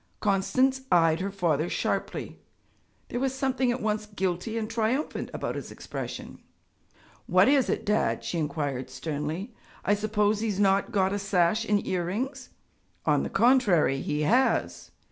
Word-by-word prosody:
Constance 255 +7 +2
eyed 165 -2 +4
her 195 +2 -2
father 170 -5 0
sharply. - - -3 0.7
There 245 - -2
was 265 0 -1
something 265 -2 +1
at 245 0 -3
once 215 0 -1
guilty 195 +2 -2
and 220 -1 -2
triumphant 230 +6 -1
about - - -3
his - - -6
expression. - - -7 0.9
'What - - +5
is 275 -2 +3
it, - - -1
Dad?' 210 - +1
she 170 - -2
inquired 145 -4 -2
sternly. 160 - -4 0.3
'I 205 - +4
suppose 210 0 +1
he 225 0 -1
has 200 -1 -2
not 195 -1 +3
got 190 -1 +2
a 205 - -1
sash 195 +2 +1
and 205 -2 +1
earrings.' 225 +10 -3 0.6
'On - - +3
the - - -3
contrary, 205 - +3
he 150 0 -2
has.' 120 - +1
205 Hz, 150 wpm, -27 LUFS, 170-230 Hz, 0.9 s, What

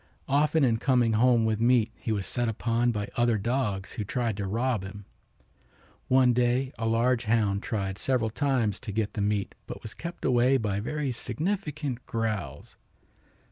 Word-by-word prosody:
Often 150 +2 +3
in 115 -4 +3
coming 120 -2 +2
home 115 0 +4
with 110 0 0
meat 120 -1 +3
he 115 - -5
was 100 -3 -1
set 120 +2 -1
upon 115 +2 0
by 105 -3 -3
other 120 -2 +2
dogs 105 -3 -1
who 105 - -4
tried 115 +1 -1
to 100 -2 -3
rob 115 +2 0
him. 95 +1 -9 1.0
One 130 -1 +5
day 125 +2 +1
a 115 - -1
large 120 +2 +2
hound 105 -3 +1
tried 100 -2 -3
several 120 -4 0
times 125 -5 0
to 115 - -6
get 105 0 -1
the 105 - -2
meat, 100 -1 0
but - - -8
was 110 - -6
kept 170 +1 -7
away 125 +1 +4
by 105 -5 -1
very 140 +5 -2
significant 150 - -3
growls. 110 -3 -3
115 Hz, 170 wpm, -27 LUFS, 105-130 Hz, 1.0 s, One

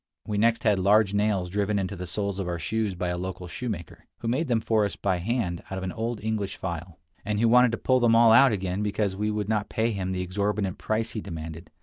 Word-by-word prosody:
We 105 -1 -2
next 115 +1 +2
had 105 -3 +3
large 100 +1 +4
nails 100 -3 +1
driven 100 +1 0
into 100 0 -2
the 90 -1 -6
souls 100 +2 -2
of 95 - -2
our 85 -1 -2
shoes 105 +4 -2
by 90 0 -2
a 90 0 -2
local 90 0 -5
shoemaker, 100 -4 -6
who 115 - -6
made 135 +8 0
them 120 -3 +2
for 110 -1 +1
us 100 - -2
by 95 -2 0
hand 90 -2 -2
out 95 - -4
of 95 - -4
an 95 - -3
old 115 +2 -4
English 105 -3 -2
file, 85 -2 -5 0.3
and 105 0 -1
who 115 - +4
wanted 125 +1 +6
to - - 0
pull 130 -1 +2
them 120 -2 +4
all 115 -1 +7
out 130 +3 +7
again 95 -1 -2
because 105 -1 -1
we 105 +2 -1
would 105 -1 -2
not 105 -1 -1
pay 115 +1 0
him 95 -3 -3
the 90 -1 -2
exorbitant 100 +1 -1
price 110 +1 -1
he 110 - -4
demanded. 80 -2 -7
105 Hz, 250 wpm, -26 LUFS, 95-110 Hz, 0.3 s, all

